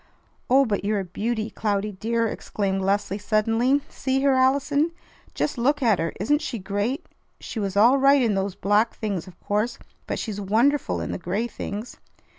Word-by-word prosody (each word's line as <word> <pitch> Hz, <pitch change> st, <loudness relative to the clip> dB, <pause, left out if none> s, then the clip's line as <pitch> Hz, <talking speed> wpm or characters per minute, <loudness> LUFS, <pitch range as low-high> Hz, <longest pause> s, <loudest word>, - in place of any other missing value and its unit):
"Oh, 270 Hz, +2 st, +5 dB
but 205 Hz, -5 st, -1 dB
you're 210 Hz, 0 st, 0 dB
a -, -, -6 dB
beauty, 220 Hz, +4 st, -3 dB
Cloudy, 210 Hz, -1 st, -1 dB
dear!" 230 Hz, +4 st, -1 dB
exclaimed 195 Hz, -3 st, -2 dB
Leslie 200 Hz, +1 st, 0 dB
suddenly. 225 Hz, +6 st, +2 dB
"See 265 Hz, 0 st, -1 dB
her, 275 Hz, -1 st, +4 dB
Allison! 280 Hz, +4 st, +2 dB, 0.4 s
Just 285 Hz, -, -1 dB
look 280 Hz, +4 st, +2 dB
at 220 Hz, -6 st, +3 dB
her. 165 Hz, 0 st, -1 dB
Isn't 295 Hz, -, +2 dB
she 275 Hz, -6 st, -4 dB
great? 205 Hz, -, -2 dB, 0.3 s
She 225 Hz, -, -6 dB
was 200 Hz, -1 st, -2 dB
all 240 Hz, +6 st, +6 dB
right 275 Hz, 0 st, +5 dB
in 225 Hz, -3 st, +2 dB
those 195 Hz, -1 st, -1 dB
black 210 Hz, +3 st, +2 dB
things, 200 Hz, -5 st, -3 dB
of 180 Hz, -2 st, -14 dB
course, 210 Hz, +4 st, -1 dB, 0.3 s
but -, -, -2 dB
she's 205 Hz, -3 st, -4 dB
wonderful 235 Hz, +9 st, +1 dB
in -, -, -4 dB
the -, -, -4 dB
gray 190 Hz, +6 st, -1 dB
things!" 215 Hz, -1 st, -6 dB
220 Hz, 180 wpm, -24 LUFS, 200-260 Hz, 0.4 s, all